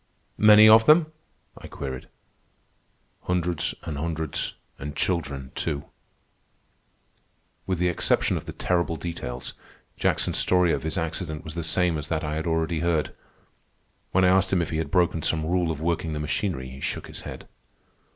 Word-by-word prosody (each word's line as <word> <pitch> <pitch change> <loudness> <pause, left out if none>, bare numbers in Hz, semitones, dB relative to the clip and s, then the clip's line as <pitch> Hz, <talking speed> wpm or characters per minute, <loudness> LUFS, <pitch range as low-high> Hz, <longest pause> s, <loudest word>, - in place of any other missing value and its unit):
"Many 105 0 +8
of 110 +1 +7
them?" 155 0 +6 0.4
I - - -11
queried. 65 -2 -6 1.2
"Hundreds 90 -2 0
an' 80 -4 -4
hundreds, 80 -1 -2 0.2
an' 75 +1 -6
children, 70 -8 -2
too." 70 0 -2 1.8
With 95 -1 0
the 90 +1 +1
exception 90 - +1
of - - -5
the - - -6
terrible 85 -2 0
details, 65 -8 -5 0.4
Jackson's - - +1
story 90 -2 +3
of - - -1
his 80 +1 -2
accident 80 -1 -3
was 80 - -7
the 85 - -3
same 85 0 +1
as 75 - -6
that 80 0 -2
I 75 0 -2
had 80 +2 -3
already 80 0 0
heard. 85 -2 0 1.0
When 95 0 +4
I - - +5
asked 95 0 +3
him 90 -3 +2
if 80 - -6
he 80 - -1
had 80 -2 -2
broken 85 -2 +2
some 80 +1 0
rule 90 0 +1
of 80 -2 -3
working 80 -1 -1
the 75 - -3
machinery, 75 -3 -2
he 65 +1 -10
shook - - -3
his - - -7
head. - - -9
80 Hz, 165 wpm, -25 LUFS, 75-90 Hz, 1.8 s, Many